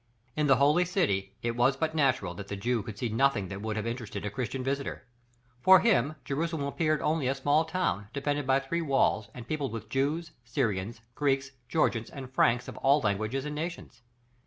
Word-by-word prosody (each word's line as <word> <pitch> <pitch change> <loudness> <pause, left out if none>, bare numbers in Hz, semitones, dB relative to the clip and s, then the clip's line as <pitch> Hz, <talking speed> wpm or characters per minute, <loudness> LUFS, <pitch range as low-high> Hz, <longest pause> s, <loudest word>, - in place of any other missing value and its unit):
In 150 -1 +1
the 135 - +6
holy 145 +6 +4
city, 100 - 0
it 120 0 -1
was 125 +3 +3
but 155 +1 -1
natural 130 - +1
that 100 +3 -8
the 100 - -4
Jew 120 +3 0
could 105 -2 -8
see 120 0 -2
nothing 115 -4 +1
that 100 0 -6
would 110 0 -3
have 110 - -2
interested 115 -3 -4
a 105 - -3
Christian 125 +3 -3
visitor. 140 0 -3 0.6
For 185 +3 +8
him, 155 - +2
Jerusalem 155 +1 -2
appeared 155 +1 0
only 155 -3 +1
a 135 - +1
small 145 +4 +2
town, 160 - -1
defended 145 0 -2
by 135 +1 +3
three 170 +5 -2
walls 135 -8 +1
and 125 -2 -9
peopled 145 -6 -2
with 110 -1 -6
Jews, 145 +7 -1
Syrians, 115 -2 -2
Greeks, 135 0 0 0.2
Georgians, 115 -8 +1
and 130 -2 -9
Franks 120 -1 +3
of - - -8
all 140 +2 +4
languages 110 +6 -1
and 150 - -4
nations. 165 -4 -6
135 Hz, 195 wpm, -29 LUFS, 115-150 Hz, 0.6 s, For